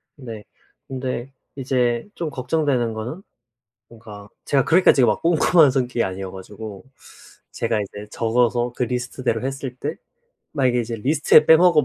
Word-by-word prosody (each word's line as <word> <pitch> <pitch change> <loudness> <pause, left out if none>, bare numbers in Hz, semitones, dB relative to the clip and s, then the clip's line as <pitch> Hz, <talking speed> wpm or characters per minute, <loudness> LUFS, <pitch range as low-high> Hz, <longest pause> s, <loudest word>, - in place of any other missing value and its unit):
네. 115 -7 -9 0.4
근데 130 -1 -4 0.3
이제 125 - 0
좀 165 -3 -3
걱정되는 130 -4 -1
거는 120 - -6 0.7
뭔가 105 -3 -12 0.2
제가 135 -3 +2
그렇게까지 165 -6 +5
막 - - +1
꼼꼼한 165 -2 +4
성격이 125 -2 0
아니어 95 0 -5
가지고 100 +1 -9 0.7
제가 110 -2 -1
이제 105 +1 -8
적어서 120 +1 +1
그 125 - -1
리스트대로 125 -1 -2
했을 135 -2 -4
때 145 +5 -4 0.6
만약에 125 -4 +1
이제 115 0 -4
리스트에 150 +5 +4
빼먹어 160 -1 +6
125 Hz, 315 characters per minute, -22 LUFS, 115-140 Hz, 0.7 s, 빼먹어